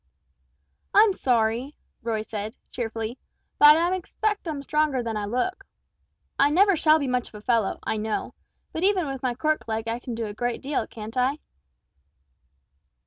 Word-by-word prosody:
"I'm 415 0 +7
sorry," 245 -1 0 0.3
Roy 225 -2 -2
said, 215 +1 -6
cheerfully; 225 0 -4 0.4
"but 295 +1 +9
I 345 +2 +2
expect 415 +2 -2
I'm 295 -3 -4
stronger 300 -3 +1
than 225 -1 -3
I 210 -1 -2
look. 305 - -2 0.8
I 280 - +6
never 390 +5 +5
shall 310 -1 +5
be 285 -3 -2
much 250 -1 0
of - - -15
a 210 - -9
fellow, 230 -5 +1
I 220 - -1
know; 215 0 -3 0.4
but 320 - -3
even 380 -3 +3
with 270 -2 -5
my 250 -2 -1
cork 305 +2 0
leg 220 0 -2
I 230 +1 -2
can 245 -1 -6
do 230 0 -3
a 205 - -5
good 240 +2 -2
deal, 280 +1 -2
can't 220 +1 -9
I?" 260 +3 +2
250 Hz, 170 wpm, -25 LUFS, 225-310 Hz, 0.8 s, but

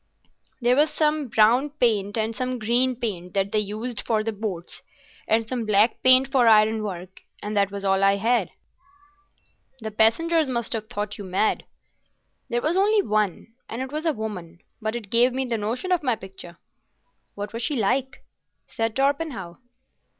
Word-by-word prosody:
There 245 +1 +3
was 300 +3 +3
some 300 -2 0
brown 235 +5 +3
paint 205 -3 +1
and 220 +1 -1
some 255 +2 -2
green 245 +3 +1
paint 195 -7 -5
that 195 0 0
they 215 - +2
used 215 +3 -4
for 220 -2 0
the 225 - -2
boats, 195 -5 -6 0.5
and 220 0 +2
some 245 -1 -3
black 215 +1 +2
paint 255 +1 +7
for 250 -3 +3
ironwork, 215 -4 +1 0.2
and 210 +1 -4
that 200 -1 +2
was 200 0 -6
all 195 0 +2
I 195 0 +5
had." 230 +5 +1 1.3
"The 220 -3 -6
passengers 305 +9 +2
must 235 -3 -1
have 215 -1 -4
thought 205 0 -5
you - - -6
mad." 190 +3 0 0.8
"There 240 0 -1
was 325 +4 +1
only 410 +1 +3
one, 215 - -1 0.2
and 230 - -5
it 265 - -8
was 310 +3 -3
a - - +4
woman; 185 -7 -7 0.2
but 220 +1 -2
it 215 -5 -7
gave 240 +2 +4
me 265 +1 -1
the 235 -3 -2
notion 240 - -3
of 360 - +2
my 255 -5 +1
picture." 190 -4 -11 0.8
"What 205 +1 -6
was 230 - -4
she 290 +5 -1
like?" 260 +4 -1 0.5
said 225 -2 -2
Torpenhow. 270 - -1
225 Hz, 170 wpm, -24 LUFS, 205-255 Hz, 1.3 s, paint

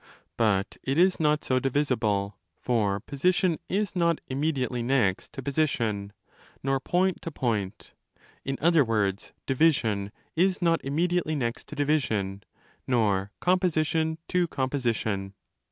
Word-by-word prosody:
_ - - -31 0.3
But 100 -3 +1
it 135 +2 -1
is 185 +2 +4
not 150 -1 +2
so 130 -1 +1
divisible: 120 -8 0 0.2
for 105 -5 +1
position 170 - +1
is 200 0 -1
not 170 -2 +2
'immediately 130 -3 -1
next' 115 -6 +1
to 135 -3 -6
position, 120 -8 -1 0.5
nor 135 0 +1
point 180 +6 0
to - - -4
point—in 120 - -5
other 165 -1 +4
words, 105 -4 -1
division 120 -9 +2 0.2
is 185 +3 +2
not 165 -2 +2
'immediately 160 +3 0
next' 120 -4 -3
to - - -8
division, 110 -10 0 0.5
nor 100 -5 +1
composition 160 -3 +1
to 180 -1 +2
composition. 115 -9 -2
135 Hz, 120 wpm, -27 LUFS, 110-160 Hz, 0.5 s, is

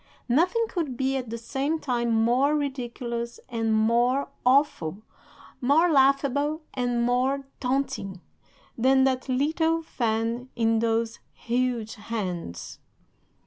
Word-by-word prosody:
"'Nothing 355 - +2
could 315 - -3
be 265 +1 0
at 255 -3 -3
the 230 - -4
same 275 +7 -2
time 240 -5 -1
more 240 +6 +3
ridiculous 240 -4 -4
and 225 -2 -1
more 235 +5 +2
awful, 250 - +2 0.6
more 310 +7 +4
laughable 285 +2 +2
and 245 -2 0
more 260 +3 +1
taunting, 260 -7 -2 0.6
than 265 +2 +4
that 260 0 0
little 320 +5 +1
fan 230 -2 -2
in 225 -1 +2
those 225 0 0
huge 240 -2 -1
hands. 185 - -5
250 Hz, 110 wpm, -26 LUFS, 230-275 Hz, 0.6 s, more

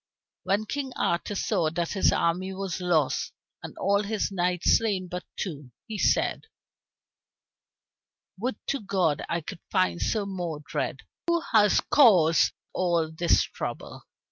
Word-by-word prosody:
When 205 +3 0
King 270 +2 -4
Arthur 170 +4 -1
saw 185 -5 +1
that 170 +1 -2
his 195 - +3
army 185 +3 0
was 190 -1 -4
lost 165 -6 +1 0.3
and - - -9
all 200 +1 +2
his 210 0 -2
knights 180 -2 +2
slain 200 -5 -1
but 180 +1 -5
two, 145 -7 -5 0.2
he 215 -2 -6
said, - - +1 1.9
"Would 250 +5 -2
to 275 - -1
God 185 -7 0
I 170 0 -1
could 160 - -8
find 90 -1 +1
Sir 200 - 0
Modred, 175 -6 -4 0.3
who 340 0 +2
has 210 -3 +5
caused 180 - +5 0.2
all 170 -3 +1
this 170 +2 +3
trouble." - - -6
185 Hz, 135 wpm, -27 LUFS, 170-205 Hz, 1.9 s, has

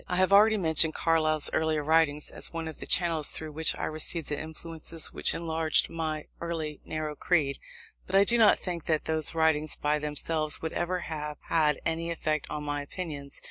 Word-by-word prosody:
I 180 - -2
have 185 +2 +2
already 215 +2 +6
mentioned 160 -3 +4
Carlyle's 155 -2 +3
earlier 160 -1 0
writings 150 -1 +1
as - - -3
one 165 -1 -5
of 160 - -8
the - - -7
channels 165 -4 +2
through 155 -1 -3
which 160 +2 +1
I - - -6
received 155 0 -3
the 150 -1 -3
influences 160 0 -5
which - - +2
enlarged 160 -2 0
my 155 -2 -3
early 160 -3 -4
narrow 155 -1 -4
creed; 145 -4 0 0.5
but 185 - -2
I 195 - +7
do 235 +3 +3
not 215 -2 +6
think 175 -3 -5
that 155 -2 0
those 160 0 +1
writings, 155 -1 +1
by 150 +1 0
themselves, 150 +1 0
would 160 - -5
ever 180 +1 -2
have 150 -2 -5
had 150 -3 +2
any 165 +1 -1
effect 155 -3 -2
on 150 -1 -4
my 145 0 -3
opinions. 145 -2 -7
160 Hz, 190 wpm, -28 LUFS, 150-165 Hz, 0.5 s, I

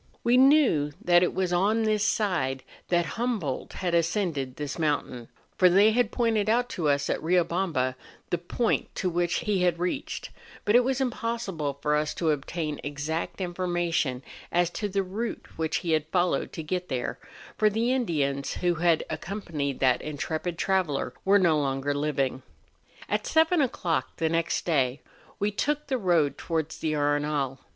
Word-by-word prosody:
We 240 +1 +4
knew 255 - +5
that 175 0 +4
it 180 - +2
was 185 -1 -1
on 210 +6 +2
this 215 -1 +1
side 180 - 0 0.2
that 175 -1 +2
Hum¬ 235 - -1
boldt 140 -7 -4
had 180 -2 -2
ascended 165 -6 0
this 145 +2 -5
mountain; 145 -6 -1 0.3
for 185 - +7
they 200 +4 +6
had 240 -1 +2
pointed 225 -4 +1
out 245 +2 +2
to 165 -10 -1
us 140 0 +1
at - - -1
Riobamba 170 -5 +1 0.4
the 175 - +1
point 220 +7 -1
to 185 -3 -1
which 175 0 0
he 200 -3 0
had 175 -2 +2
reached; 180 +1 -3 0.3
but 210 - +3
^ 245 - +7
was 265 +1 0
impossible 230 - -2
for 150 0 +2
us 150 0 -1
to 165 -3 +1
obtain 150 +1 -3
exact 150 +5 -3
information 175 -7 -1 0.3
as 175 0 +2
to 205 +2 -3
tlie 195 0 0
route 220 +5 -4
which 160 -1 -1
he 165 - 0
had 155 -1 +1
followed 175 +2 0
to 160 - -5
get 180 +3 -3
there, 125 -2 -3 0.4
for 215 - +3
the 230 +4 +1
Indians 145 - -1
who 175 -1 +1
had 165 -1 +2
accompanied 160 -9 -4
that 130 -2 +3
intrepid 155 +3 -3
traveller 170 -11 0
were 200 +1 +5
no 170 -5 +3
longer 135 0 -1
living. 140 -3 -1 0.7
At - - -1
seven 320 +1 +3
o'clock 180 - -1
the 160 - +1
next 165 0 0
day 135 -5 +1 0.4
we 205 +1 0
took 295 +8 -1
the 265 -3 -1
road 170 -7 +2
towards 160 -2 -3
the 155 -1 -1
Arenal. 145 -2 0
175 Hz, 170 wpm, -27 LUFS, 150-205 Hz, 0.7 s, for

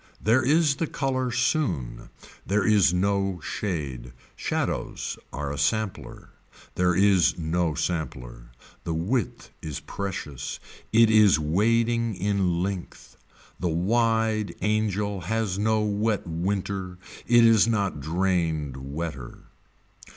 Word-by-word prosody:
There 115 +4 +3
is 145 +1 +3
the 165 - -1
color 130 -3 -1
soon. 95 - -1 0.3
There 100 0 0
is 105 -5 +4
no 95 0 0
shade. 70 -12 -4 0.2
Shadows - - -3
are 70 -1 -4
a 75 - -5
sampler. 100 +7 -2 0.4
There 90 -1 +2
is 95 -4 +4
no 85 -1 -1
sampler. 60 -9 -4 0.3
The 80 - -2
width 100 +7 -2
is 75 -3 -5
precious. 90 -9 -5 0.3
It 115 0 +5
is 105 -7 +6
wading 115 +8 +1
in 90 -2 0
length. 95 -2 -6 0.4
The 90 - -1
wide 110 +4 +1
angel 105 -2 0
has 105 -1 -1
no 110 +1 +2
wet 105 0 0
winter. 90 +2 -3 0.3
It 120 -1 +6
is 115 -1 +5
not 100 -9 0
drained 80 -4 -1
wetter. 70 -1 -6
95 Hz, 115 wpm, -25 LUFS, 80-110 Hz, 0.4 s, is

